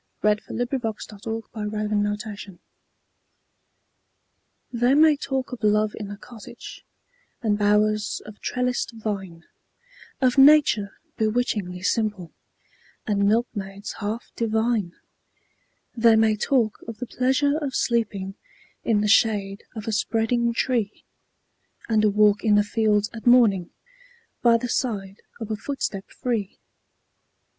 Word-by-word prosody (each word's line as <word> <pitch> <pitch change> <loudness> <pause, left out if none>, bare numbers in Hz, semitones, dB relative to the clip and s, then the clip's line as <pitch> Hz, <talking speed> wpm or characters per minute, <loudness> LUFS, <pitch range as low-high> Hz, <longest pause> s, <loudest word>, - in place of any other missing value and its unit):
Nathaniel 210 +3 0
Parker 240 -4 -3 0.3
Willis 225 0 -3 0.2
Love 210 0 -4
in 210 -1 0
a 205 0 -1
Cottage 205 -4 -9 2.1
THEY 245 +3 +3
may 310 0 +6
talk 270 -2 -3
of 245 -3 -8
love 210 0 +3
in 205 -2 -7
a 205 - -7
cottage 225 +1 -11 0.6
And 215 -2 +2
bowers 210 +1 +2
of 210 0 -12
trellised 250 -1 -2
vine 195 -6 -5 0.8
Of 255 0 +2
nature 270 -8 +5 0.2
bewitchingly 215 -5 -1
simple, 205 -6 -1 0.7
And 200 -2 +1
milkmaids 205 -3 -2
half 215 +2 -4
divine; 220 -4 0 1.0
They 230 -1 +5
may 220 -1 +3
talk 230 -1 0
of 230 -2 -7
the 250 - -5
pleasure 265 +4 +1
of 280 -4 -4
sleeping 205 -5 -1 0.5
In 215 -3 +2
the 210 - +1
shade 205 -2 +2
of 220 -1 -7
a - - 0
spreading 225 +2 +1
tree, 230 -3 -1 0.8
And 220 -2 +2
a 215 - +5
walk 205 0 +3
in 215 -2 +4
the 205 - +4
fields 210 -1 +1
at 225 +1 -7
morning, 215 -8 +5 0.7
By 235 -1 +5
the 245 - -4
side 200 -6 -3 0.2
of 220 -1 -5
a - - 0
footstep 215 -4 -4
free! 225 -6 -3
215 Hz, 125 wpm, -24 LUFS, 205-240 Hz, 2.1 s, may